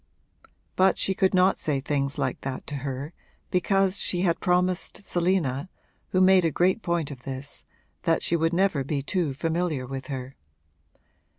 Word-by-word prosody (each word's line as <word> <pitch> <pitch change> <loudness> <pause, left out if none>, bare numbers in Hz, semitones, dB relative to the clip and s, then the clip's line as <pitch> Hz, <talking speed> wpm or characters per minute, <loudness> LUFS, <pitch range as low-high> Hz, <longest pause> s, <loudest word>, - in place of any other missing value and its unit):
But 190 +1 +4
she 190 - +1
could 190 0 +2
not 185 +1 +4
say 145 -3 0
things 140 0 -1
like - - -2
that 130 -1 -5
to 145 - -5
her, 135 +3 -5 0.4
because 195 +1 +2
she 175 - +1
had 170 -3 +1
promised 180 +2 0
Selina, 175 -5 0 0.4
who 185 - +1
made 185 -1 +6
a 165 - +3
great 180 +8 +2
point 170 -5 -1
of 130 -3 -9
this, 135 +2 -6 0.4
that 165 -1 +1
she 170 - +1
would 165 0 +1
never 180 -5 +2
be 140 0 -2
too 160 -4 -1
familiar 160 -3 -1
with 135 0 -6
her. 130 -1 -6
165 Hz, 165 wpm, -26 LUFS, 140-185 Hz, 0.4 s, made